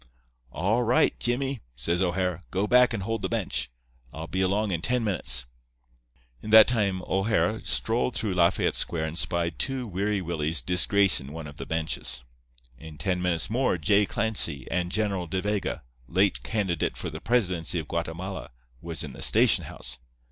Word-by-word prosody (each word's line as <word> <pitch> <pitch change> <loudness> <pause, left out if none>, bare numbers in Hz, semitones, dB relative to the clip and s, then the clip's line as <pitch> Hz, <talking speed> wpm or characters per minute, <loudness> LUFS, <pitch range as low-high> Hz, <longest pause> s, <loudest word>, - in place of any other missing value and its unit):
'All 105 +8 +1
right, 120 +1 +3
Jimmy,' 135 +2 -1 0.2
says 85 +9 -1
O'Hara. 90 -1 0
'Go 95 +2 0
back 125 +3 +5
and 110 -5 -3
hold 115 +1 -2
the - - -2
bench. 115 - -1 0.4
I'll 80 +4 -7
be 95 +3 -2
along 100 +2 +1
in 85 -2 -1
ten 125 +5 +1
minutes.' 80 - 0 1.0
"In 110 - -8
that 110 0 +9
time 100 -6 0
O'Hara 105 +3 +1
strolled 115 +1 0
through 110 -3 -1
Lafayette 90 +1 +2
Square 80 -2 0
and 80 0 -5
spied 85 -1 -1
two 135 -2 -1
Weary 100 0 -1
Willies 80 -5 -1
disgracin' 90 -3 +4
one 80 0 -7
of 75 -1 -10
the - - -7
benches. 80 -5 -2 0.6
In 80 -2 -11
ten 90 0 -1
minutes 85 -3 +1
more 120 -2 +1
J. 100 +5 +3
Clancy 95 - -1
and 90 0 -1
General 100 -4 -1
De 95 +3 -2
Vega, 105 -6 -2 0.2
late 95 +8 +2
candidate 95 -7 -1
for - - -5
the - - -8
presidency 90 -9 +1
of 80 -3 -4
Guatemala, 85 +3 -4 0.3
was 80 -2 -4
in 70 -3 -7
the - - -11
station - - +3
house. 65 +1 -7
95 Hz, 170 wpm, -26 LUFS, 85-105 Hz, 1.0 s, that